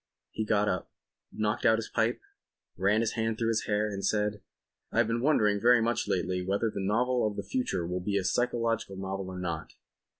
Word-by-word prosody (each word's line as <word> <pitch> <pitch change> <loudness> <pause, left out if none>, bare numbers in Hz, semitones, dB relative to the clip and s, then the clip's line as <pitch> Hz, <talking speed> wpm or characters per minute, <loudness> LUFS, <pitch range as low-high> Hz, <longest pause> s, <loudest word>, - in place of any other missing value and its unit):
He 110 - -2
got 105 -1 +2
up, 90 -3 -1 0.4
knocked 105 0 -1
out 110 - +5
his 115 - -4
pipe, - - +1 0.5
ran 100 +4 +2
his 115 - 0
hand 115 -1 -1
through 115 0 0
his 110 -1 0
hair 105 0 +1
and 100 -2 -5
said: 105 -1 0 0.5
"I - - -4
have 120 - +5
been 115 +1 -1
wondering 105 -8 +3
very 120 0 +6
much 115 0 0
lately 90 0 0
whether 100 +4 0
the - - -4
novel 120 +4 +2
of 105 - -4
the - - -4
future 250 - -1
will 90 +1 -3
be 100 +2 0
a 95 - 0
psychological 115 0 0
novel 95 0 -4
or 95 - -6
not. 85 -3 -4
105 Hz, 205 wpm, -29 LUFS, 95-115 Hz, 0.5 s, very